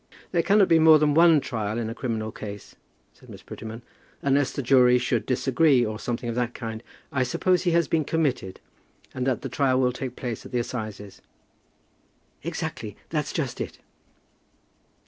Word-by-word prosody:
"There 170 - +2
cannot 200 +2 +4
be 165 - +5
more 160 -1 +8
than 150 -1 +2
one 165 0 +6
trial 110 -4 -3
in 115 -2 -2
a 115 - -4
criminal 110 -3 -3
case," 105 -1 -9 0.4
said - - -20
Miss - - -11
Prettyman, 110 +1 -8 0.4
"unless 140 0 +2
the 140 - -4
jury 125 -1 +5
should 125 0 -1
disagree, 130 +1 +3
or 110 0 -4
something 120 0 -3
of 115 - -2
that 120 0 -2
kind. 110 -1 -6 0.3
I 130 - 0
suppose 180 +8 +1
he 175 - +3
has 170 -3 +3
been 160 +1 +1
committed, 140 - -1 0.5
and 130 0 -2
that 130 -4 0
the - - -2
trial 130 -2 +1
will 125 -1 +2
take 125 -1 -5
place 120 -4 -5
at - - -11
the 125 - -1
assizes." 110 -5 -5 1.2
"Exactly, - - -5
that's - - -2
just - - -3
it." - - -6
125 Hz, 175 wpm, -25 LUFS, 115-145 Hz, 1.2 s, more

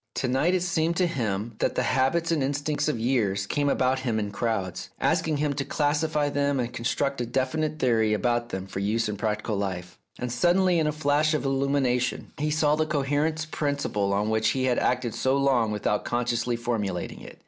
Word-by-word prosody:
To 130 - -1
night 140 +9 +2
it 180 - 0
seemed 170 -1 0
to 185 - +3
him 115 - -2
that - - 0
the - - +1
habits 150 +6 +1
and 160 -3 +1
instincts 145 +2 -1
of 150 - 0
years 110 -5 +1
came 145 +7 0
about 130 -1 +2
him 120 -4 -1
in 105 -2 -2
crowds, 100 -4 -2
asking 155 -2 +1
him 145 0 0
to 140 0 -2
classify 150 +1 0
them 145 -1 0
and 120 -1 -2
construct 125 +3 -1
a - - -1
definite 155 +5 -1
theory 115 -5 +2
about 120 +1 0
them 95 -3 -4
for 95 0 -6
use 110 +3 0
in 105 - -3
practical 105 0 -2
life, 90 -3 -4 0.2
and 125 -1 -4
suddenly, 175 +7 +3
in 155 - +1
a - - +2
flash 150 +1 +2
of 150 - -2
illumination, 135 -2 0
he 150 +1 0
saw 150 -1 +2
the 155 0 0
cohering 145 +1 0 0.2
prin 145 -2 0
ciple 105 -8 -1
on 105 +2 0
which 110 0 +2
he 130 - 0
had 125 -2 +2
acted 125 -2 0
so 130 +1 +1
long 130 -5 +2
without 105 0 0
con 120 0 -1
sciously 120 0 0
formulating 105 -7 -3
it. - - -11
130 Hz, 205 wpm, -26 LUFS, 110-145 Hz, 0.2 s, to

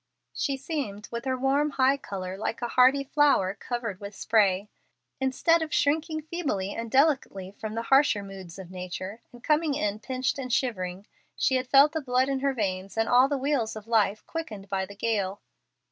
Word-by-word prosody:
She 275 -1 -1
seemed, 260 -8 -4
with 235 +1 -5
her 260 -1 0
warm, 275 +3 +2
high 270 -1 +3
color, 190 -7 -6
like 215 +3 -3
a 240 - -1
hardy 260 +3 +5
flower 275 -10 +3
covered 225 -3 -4
with 200 0 -8
spray. 205 -3 +2 0.5
Instead 270 +6 +2
of 315 -1 -3
shrinking 310 +2 +1
feebly 285 - -2
and 230 0 -5
delicately 265 -9 +1
from 215 +2 -7
the 230 - -2
harsher 270 -5 +4
moods 190 -3 -10
of 185 -2 -10
nature, 185 +3 -6
and 240 0 -15
coming 305 -1 +2
in 210 -7 -1
pinched 260 +4 -2
and 255 -2 -4
shivering, 195 -7 -1 0.3
she 275 - +1
had 255 0 0
felt 280 +3 +6
the 320 0 -2
blood 255 0 +1
in 270 -1 0
her 275 0 0
veins 195 -2 -3
and 225 0 +2
all 250 +2 +6
the 285 0 -1
wheels 265 -5 0
of 215 -1 -8
life 215 -2 +1
quickened 215 -12 -6
by 190 -1 -1
the 200 - -11
gale. 205 -2 -1
240 Hz, 190 wpm, -27 LUFS, 200-275 Hz, 0.5 s, felt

